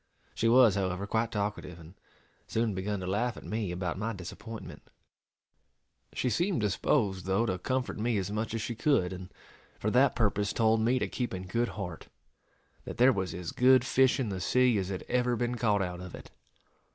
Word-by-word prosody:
She 115 - +1
was, 120 -3 +6
however, 95 -1 -1
quite 110 +2 -1
talkative, 100 -4 -3
and 85 +1 -13 0.5
soon 110 -1 0
begun 95 +1 -3
to - - -4
laugh 110 +6 -1
at - - -10
me 105 -4 -3
about 90 0 -3
my 115 +2 -2
disappointment. 110 +4 -8 1.3
She - - -2
seemed 170 - +1
disposed, 100 -1 0
though, 95 +5 +2
to 95 -4 -2
comfort 130 +3 -2
me 115 0 0
as 95 0 -2
much 110 +1 -2
as 115 - -2
she 120 - -3
could; 110 -7 +1
and, 95 0 -9 0.5
for - - -1
that - - +4
purpose, 100 0 +1
told 110 -1 +3
me 120 +3 +2
to - - -1
keep 120 -6 -3
in 95 0 -6
good 115 +6 0
heart, 90 -5 -6 0.8
that - - -7
"there 130 +2 +6
was 95 -5 -3
as 90 -2 -5
good 130 0 +5
fish 130 +1 +3
in 125 -5 -1
the 95 -2 -4
sea 125 +1 +3
as 95 -1 -3
had 95 -2 -4
ever 125 0 +1
been 120 +1 -1
caught 105 -5 +1
out 90 -1 -5
of 90 -1 -8
it." - - -12
105 Hz, 195 wpm, -30 LUFS, 95-120 Hz, 1.3 s, was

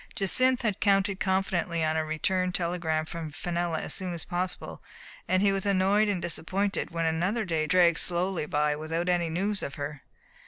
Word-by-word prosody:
Jacynth 255 +6 +3
had 210 -4 0
counted 195 -1 +2
confidently 190 -3 0
on 155 0 +1
a 160 - +1
return 180 +4 0
telegram 170 -3 -1
from 160 -1 -6
Fenella 170 -1 -2
as - - -2
soon 180 -2 -3
as 165 - -5
possible, 180 0 -4 0.5
and 185 +1 +2
he 200 - +4
was 195 -1 -1
annoyed 200 +2 +3
and 200 -3 0
disappointed 185 +4 -1
when 165 -1 -2
another 180 +8 0
day 160 -4 -1
dragged 170 0 +4
slowly 175 -2 -1
by 150 0 +1
without 160 +3 -3
any 175 -2 +1
news 195 +5 -1
of 140 - -5
her. 145 0 -5
175 Hz, 180 wpm, -28 LUFS, 160-195 Hz, 0.5 s, he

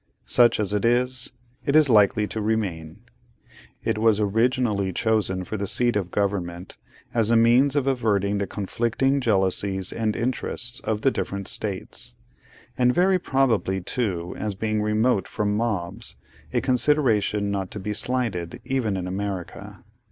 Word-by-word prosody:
Such 120 -2 +4
as 105 -1 0
it 105 - 0
is, 125 +2 +1 0.3
it 140 - 0
is 155 -2 +6
likely 105 -2 +4
to 110 - -4
remain. 95 -8 -2 0.8
It 110 - -1
was 110 -1 +3
originally 105 -2 +1
chosen 100 -2 0
for 110 - -5
the 100 0 -3
seat 120 +3 +2
of 95 -4 -1
Government, 95 -3 -2 0.4
as 115 -2 +2
a 115 - +4
means 120 +5 +4
of 140 -2 +1
averting 105 -6 +1
the 100 - -2
conflicting 120 +8 0
jealousies 95 -3 0
and 110 -2 -1
interests 120 0 -2
of 110 -1 -2
the 135 - +3
different 100 -5 -4
States; 100 -3 -4 0.6
and 125 -1 +3
very 185 +6 +3
probably, 125 - +1
too, 90 -4 -2
as 105 -2 -3
being 110 +1 -1
remote 105 -1 +1
from 105 -1 -1
mobs: 105 -1 -3 0.4
a - - +1
consideration 115 -6 +1
not 95 -2 -2
to 105 - -6
be 105 +2 -3
slighted, 105 -8 -2
even 125 -7 -1
in 90 - -3
America. 100 +1 -5
105 Hz, 150 wpm, -24 LUFS, 100-120 Hz, 0.8 s, is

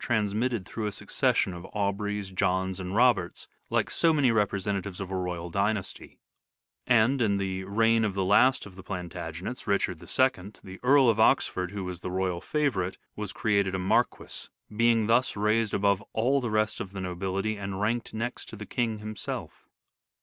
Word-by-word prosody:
transmitted 110 -1 0
through 110 +1 -4
a - - -2
succession 95 - 0
of 85 0 -8
Aubreys, 100 0 -2
Johns, 95 +1 0
and 95 +1 -4
Roberts, 115 -8 +2 0.2
like - - 0
so 165 - +3
many 145 -6 +3
representatives 100 -3 -1
of 95 -1 -5
a - - -2
royal 90 -2 -3
dynasty; 100 +1 -2 0.7
and, 125 +2 +4
in 100 -3 +2
the 95 -1 -3
reign 115 +3 +3
of 105 -3 -1
the 95 -1 0
last 125 +7 +4
of 95 -3 -12
the 95 - -10
Plan 90 -2 -5
tagenets, 85 +8 -6
Richard 95 -4 0
II, 105 +1 0
the 95 0 -10
Earl 135 +1 +5
of 110 -2 +3
Oxford, 90 -4 +3
who 100 0 -5
was 90 -1 -5
the 90 - -5
royal 90 -1 -1
favourite, 115 -10 -1 0.2
was 105 -2 -3
created 100 -3 +1
a - - 0
Marquis, 110 +7 -1 0.3
being 115 -1 +3
thus 115 +1 +2
raised 105 +1 +1
above 100 -1 +2
all 130 +5 +2
the 120 - -2
rest 110 0 0
of 95 0 -6
the 95 - -5
nobility 95 +3 -2
and 100 -1 -5
ranked 115 +3 -1
next 120 +3 -4
to - - -8
the 105 0 -8
King 115 -2 -1
himself. 105 -1 -6
100 Hz, 180 wpm, -28 LUFS, 95-115 Hz, 0.7 s, Earl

